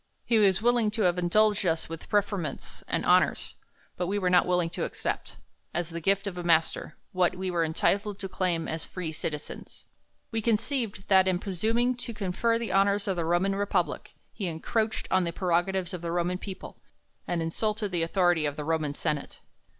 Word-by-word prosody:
He 230 -2 +3
was 195 0 +3
willing 240 -2 +3
to 220 - +2
have 180 -1 +2
indulged 210 +4 +3
us 165 -3 0
with 165 0 -8
preferments 200 -7 -1
and - - -1
honours; - - +3 0.4
but, 180 - -1
^ - - -4
we 200 +2 0
were 185 -3 +1
not 180 - +5
willing 180 -2 +1
to - - -3
accept, - - -4 0.4
as 175 0 -1
the 170 0 -5
gift 195 +4 +2
of 185 -3 -4
a - - -4
master, 165 -2 +1
' - - -46
what 180 -1 +2
we 185 0 -2
were 170 -1 +1
entitled 195 +5 +1
to 195 - -5
claim 180 -3 -1
as 160 0 -3
free 175 -4 -4
citizens. 150 -1 -6 0.5
We 225 -1 -1
conceived, 225 -2 -1
that, 190 -1 +6
in 185 -1 +2
presuming 220 +7 0
to 240 -2 -5
confer 215 +3 0
the 230 -1 -3
honors 200 +1 +3
of 190 - +1
the 170 -2 -1
Roman 175 +4 +2
Republic, 200 +1 -1 0.2
he 195 - -3
encroached 215 +7 -1
on 185 0 +4
the 170 - -1
prerogatives 180 +1 0
of 180 - -5
the 170 -1 -3
Roman 175 +1 0
people, 190 -2 -8 0.5
and 175 - -1
insulted 210 +5 -1
the 175 -2 0
authority 175 -2 +2
of 145 - -3
the 150 -1 -5
Roman 155 -2 0
senate. 150 -1 -3
185 Hz, 195 wpm, -28 LUFS, 170-205 Hz, 0.5 s, that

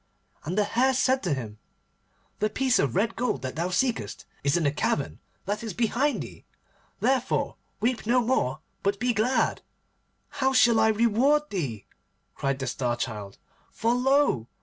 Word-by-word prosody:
And 175 +6 -3
the 210 - +4
Hare 255 +5 +2
said 260 +1 +2
to 175 -6 0
him, 110 -5 -7 0.8
'The 215 - +1
piece 260 +3 +2
of 135 -5 0
red 225 +3 +1
gold 230 - -1
that 130 - -4
thou 170 +3 -1
seekest 230 +6 -1 0.2
is 140 +3 +2
in 170 - 0
the 145 - +2
cavern 145 -1 -1 0.3
that 205 +2 -2
is 215 -6 -5
behind 245 +5 +1
thee. - - -12 0.6
Therefore 260 -2 +1 0.3
weep 235 -1 0
no 245 +2 +4
more 230 - 0 0.2
but 200 0 0
be 245 +2 +1
glad.' 235 +5 +1 0.7
'How 265 -2 0
shall 230 -2 +5
I 220 - +5
reward 235 +7 +2
thee?' 130 - -3 0.5
cried 135 -1 -1
the 135 - -4
Star 120 -1 -1
Child, 105 -5 -5 0.3
'for 230 +2 0
lo! 255 - +2
215 Hz, 165 wpm, -26 LUFS, -, 0.8 s, shall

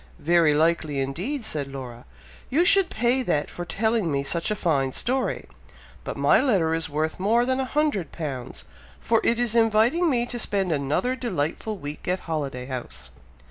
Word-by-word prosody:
"Very 165 -2 +3
likely, 155 -2 +1
indeed," 185 - -3
said 150 -10 -2
Laura; 125 -3 -8 0.4
"you 325 +7 +3
should 390 -1 +4
pay 240 +3 +1
that 150 -12 -1
for 175 - -6
telling 215 0 0
me 140 -1 0
such 165 +7 -1
a 210 - 0
fine 140 -9 0
story; 260 +2 -1 0.6
but - - -5
my - - +4
letter 185 - +2
is 165 -1 -1
worth 155 +3 -2
more 225 +5 +3
than 260 +1 0
a 265 - 0
hundred 270 - 0
pounds, 135 -7 -6 0.3
for 225 -1 +2
it 230 - +2
is 240 -2 0
inviting 230 +9 +3
me 240 -4 +1
to 240 0 -4
spend 195 -5 -1
another 150 - 0
delightful 215 - -3
week 145 -2 -7
at 180 +1 0
Holiday 140 -6 -4
House." 95 - -7
175 Hz, 175 wpm, -25 LUFS, 145-235 Hz, 0.6 s, should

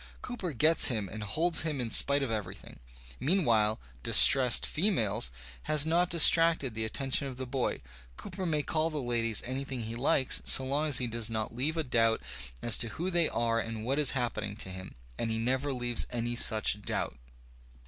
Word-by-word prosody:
Cooper 230 -9 -6
gets 155 +5 +4
him 110 -6 -2
and 110 +3 -9
holds 160 - +1
him 155 -4 -3
in 120 -3 -3
spite 140 +4 +4
of 130 - -4
everything. 100 -4 -7 0.4
Mean 170 +7 0
while 110 -2 +1
"" - - -26
distressed 130 - +5
females" 120 - 0 0.4
has 150 -1 +4
not 170 +2 +1
distracted 165 -5 +4
the 110 0 -3
attention 135 +4 -2
of 130 -2 -9
the 130 - -6
boy. 130 0 -3 0.4
Cooper 185 - -7
nuiy 150 -3 -2
call 160 0 -1
the 155 - -6
ladies 115 -5 0
anything 130 -1 -5
he 110 +1 -7
likes 130 +1 +2
so 130 - +3
long 145 +4 -2
as 145 -4 +2
he 125 - +1
does 115 -1 -3
not 110 -1 -4
leave 150 +6 -2
a 160 - 0
doubt 115 -4 +1 0.4
as 120 - +5
to 120 - +2
who 180 +4 -3
they 170 -2 +2
are 115 -1 -1
and 115 -1 -6
what 135 +4 -1
is 145 -3 +2
happening 110 -4 -3
to 100 - -4
them; 95 0 -10 0.2
and 115 - -2
he 110 - -2
never 130 +5 -1
leaves 120 -2 0
any 120 0 -4
such 110 -3 -1
doubt. 60 - -4
125 Hz, 195 wpm, -29 LUFS, 115-150 Hz, 0.4 s, distressed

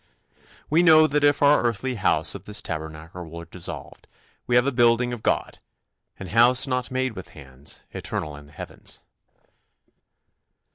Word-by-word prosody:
"We 160 +3 +3
know 160 -2 +7
that 150 -1 0
if 145 0 +3
our 145 +1 +5
earthly 120 +2 -1
house 80 -8 +2
of 100 -1 -9
this 105 0 -3
tabernacle 80 +2 -7
were 85 +1 -8
dissolved, 90 0 -6 0.4
we 120 - +1
have 125 +1 +5
a 140 - +1
building 120 0 +3
of 120 - -6
God, - - -1 0.6
an 95 - -8
house 125 +3 +4
not 125 -2 -2
made 130 -1 -1
with 90 -2 -9
hands, 65 0 -6
eternal 75 -2 -4
in 75 0 -13
the - - -19
heavens." 75 - -6
115 Hz, 155 wpm, -24 LUFS, 85-130 Hz, 0.6 s, know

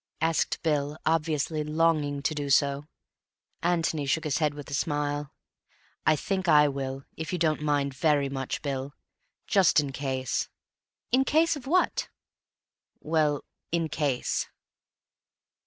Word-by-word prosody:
asked 165 0 +1
Bill, 150 -2 0
obviously 155 -1 0
longing 150 -2 +1
to 155 - +1
do 145 -2 -3
so. 140 +1 +2 0.7
Antony 165 -4 0
shook 160 +4 +1
his 150 -1 0
head 150 -2 +1
with 145 -2 -8
a - - -4
smile. 145 0 -1 0.8
"I 155 - +6
think 190 +4 -2
I 150 -2 +6
will, 135 0 -4
if 160 - -4
you 180 - -1
don't 155 -3 +1
mind 145 -2 0
very 145 +1 +2
much, 135 -1 -4
Bill. 140 0 -3 0.5
Just 190 -5 +4
in 145 -2 -1
case." 130 -2 -2 0.6
"In 260 +2 +4
case 320 +4 +3
of 270 -3 -9
what?" 360 +5 +1 0.9
"Well, 150 -2 +1 0.3
in 165 -1 0
case." 140 -6 -1
150 Hz, 135 wpm, -27 LUFS, 140-160 Hz, 0.9 s, I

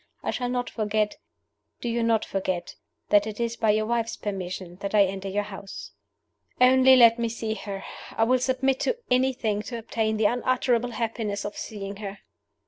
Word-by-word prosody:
I - - -1
shall 245 -2 -2
not 245 0 -1
forget 215 -1 -1 0.6
do - - -4
you 235 0 0
not 230 -1 +2
forget 185 -2 -3 0.4
that 205 0 +4
it 215 0 -6
is 235 0 -1
by 225 -2 +1
your 215 +1 +3
wife's 230 0 -1
permission 185 -3 -5
that 200 +2 -3
I 205 - +7
enter 195 0 -4
your 205 +2 0
house.' 200 -1 -8 0.7
"Only 260 +1 +7
let 235 -2 +7
me 230 -1 0
see 225 -1 -3
her! 200 -3 -6 0.3
I 225 - +4
will 255 +3 +3
submit 260 +1 +1
to 480 - 0
anything 250 -5 +1
to 235 +3 -6
obtain 220 -1 -1
the 215 - +1
unutterable 245 0 +1
happiness 220 -3 -2
of 205 - -5
seeing 200 -2 -6
her!" 200 -1 -6
220 Hz, 180 wpm, -26 LUFS, 205-240 Hz, 0.7 s, I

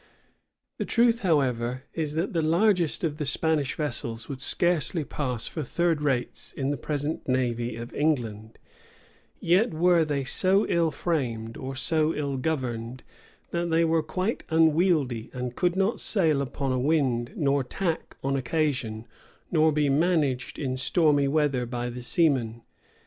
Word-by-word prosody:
[] - - -56
The - - -1
truth, 235 0 +3
however, 130 - 0
is, 155 -3 -2
that 170 +5 -1
the 165 - +1
largest 175 +1 +2
of 155 -3 -1
the 155 - -2
Spanish 155 -4 0
vessels 120 -6 -4
would 135 -2 -6
scarcely 170 +1 +1
pass 125 -5 -3
for 160 - -4
third 165 +3 0
rates 135 -4 -1
in 135 0 -2
the - - -1
present 145 +3 -3
navy 120 -3 0
of 115 +1 -8
England; 115 -8 -1 0.8
yet 180 +2 +2
were 175 0 +4
they 145 -3 -1
so 190 +9 +3
ill 170 -1 +2
framed, 125 -8 -2
or 135 0 -6
so 155 +3 +1
ill 140 -2 -2
governed, 130 -4 -3 0.5
that 170 0 -1
they 165 0 +3
were 165 0 +2
quite 185 +8 -2
unwieldy, 160 -7 +2
and 125 -1 -4
could 175 0 +1
not 200 +4 0
sail 160 -9 +2
upon 135 0 -3
a 130 - 0
wind, 130 -4 +1
nor 140 -2 +1
tack 165 +5 -3
on 135 0 0
occasion, 130 -5 -1 0.5
nor 160 -1 +4
be 150 -1 +1
managed 145 -3 +1
in 130 -3 -2
stormy 145 0 +3
weather 140 -4 +1
by 120 0 -3
the 125 +1 -7
seamen. 120 -5 +1
145 Hz, 155 wpm, -26 LUFS, 125-165 Hz, 0.8 s, were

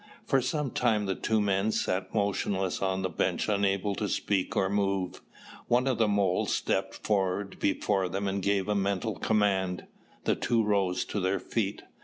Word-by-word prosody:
For 135 - +3
some 140 +1 -1
time 110 -4 +1
the 95 - 0
two 110 +3 0
men 100 +1 +1
sat 95 -2 -1
motionless 100 -2 0
on 95 -1 0
the - - +1
bench 85 - -1
unable 100 -1 +1
to 105 - -1
speak 100 +3 -1
or 95 - +3
move. 100 -2 -1 0.5
One 125 +2 +3
of 130 -3 0
the 110 - +4
moles 100 -3 +1
stepped 95 0 -1 0.5
before 95 -1 +1
them 100 +3 -2
and 95 0 -1
gave 100 0 +1
a 105 - +1
mental 100 +2 0
command. 95 -2 +1 0.4
The - - +2
two 115 -2 +1
rose 100 -3 +1
to 105 - -3
their 95 +1 0
feet. 105 -3 -2
100 Hz, 170 wpm, -29 LUFS, 95-105 Hz, 0.5 s, the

